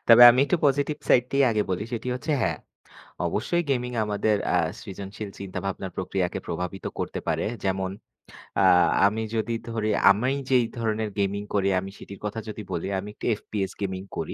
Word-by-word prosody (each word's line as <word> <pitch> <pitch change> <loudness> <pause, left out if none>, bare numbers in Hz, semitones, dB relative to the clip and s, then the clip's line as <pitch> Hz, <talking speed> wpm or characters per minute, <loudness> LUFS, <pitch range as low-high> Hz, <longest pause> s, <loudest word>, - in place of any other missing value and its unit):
তবে 115 +1 +9
আমি 125 +2 +3
একটু 160 - +1
পজিটিভ 145 +2 +2
সাইড 125 - +5
টাই 140 - +4
আগে 110 -2 +2
বলি। 90 +2 -1
সেটি 120 +1 -3
হচ্ছে 150 +5 -4
হ্যাঁ। 85 -6 +1 0.7
অবশ্যই 125 - 0
গেমিং 125 -2 0
আমাদের 105 0 +1 0.2
আ - - +4 0.2
সৃজনশীল 100 +2 -7
চিন্তাভাবনার 95 -1 -4
প্রক্রিয়াকে 90 -1 -1
প্রভাবিত 90 +2 -4
করতে - - -3
পারে। - - 0 0.2
যেমন 95 -1 0 0.7
আ - - +6 0.4
আমি 110 +2 +1
যদি 110 +1 0
ধরে 110 -2 -1 0.2
আমি 120 +6 +1 0.2
যেই 125 -3 +4
ধরনের 110 -1 -1
গেমিং 100 +1 0
করি 100 -1 +2
আমি 95 +1 -6
সেটির 100 - -10
কথা 105 +2 -3
যদি 110 - -6
বলি 85 0 -2
আমি 100 +2 -7
একটু - - -9
FPS 95 -3 -3
গেমিং 95 -2 -2 0.2
করি। - - -3
105 Hz, 170 wpm, -26 LUFS, 95-115 Hz, 0.7 s, তবে